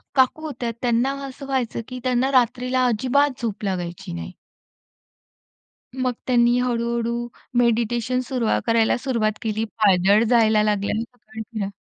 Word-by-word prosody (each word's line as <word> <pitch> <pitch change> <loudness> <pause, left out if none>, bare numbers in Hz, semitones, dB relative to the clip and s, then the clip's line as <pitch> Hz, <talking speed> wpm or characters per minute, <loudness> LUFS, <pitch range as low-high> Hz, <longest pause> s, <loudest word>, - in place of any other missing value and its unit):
काकू 260 +3 +3
होत्यात 240 -6 -4
त्यांना 245 +2 +1
असं 275 +1 -9
व्हायचं, 255 -4 -1
की 255 0 -7
त्यांना 255 +1 +1
रात्रीला 255 0 +2
अजिबात 260 +4 +1
झोप 215 -2 -3
लागायची 175 - -4
नाही. 85 -1 -6 1.6
मग 255 -1 0
त्यांनी 240 -1 +4
हळू-हळू 235 -1 -1 0.3
मेडिटेशन 235 +1 +1
सुरु 245 -4 -1 0.2
करायला 230 0 +3
सुरुवात 235 -5 0
केली, 220 0 -1
पायदळ 205 -1 +3
जायला 220 -3 +4
लागली 210 +1 0
सकाळी 235 -2 -11
फिरा 215 -3 -4
235 Hz, 125 wpm, -22 LUFS, 220-255 Hz, 1.6 s, त्यांनी